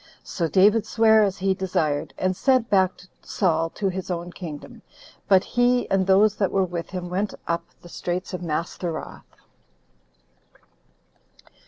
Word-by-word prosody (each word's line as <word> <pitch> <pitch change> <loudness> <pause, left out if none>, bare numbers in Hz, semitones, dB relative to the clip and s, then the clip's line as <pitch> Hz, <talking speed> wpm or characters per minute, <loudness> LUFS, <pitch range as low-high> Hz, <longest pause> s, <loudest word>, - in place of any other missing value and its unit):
So 170 -3 -2
David 205 +5 +4
sware 220 -1 +4
as 200 -2 +1
he 195 0 +1
desired, 165 -6 -1
and 185 0 0
sent 255 0 +2
back 190 -2 +2 0.2
Saul 165 -4 0
to 200 - -1
his 190 0 -5
own 175 0 -4
kingdom; 155 -6 -9 0.5
but 190 -2 +5
he, 245 0 +1
and 190 -1 +2
those 200 +2 +5
that 195 -3 0
were 195 -1 +2
with 170 -2 -5
him, 180 -1 -5
went 190 +3 -2
up 170 0 -1 0.2
the - - -11
Straits 180 +2 -4
of 180 - -4
Mastheroth. 170 0 -4
185 Hz, 145 wpm, -24 LUFS, 175-200 Hz, 0.5 s, but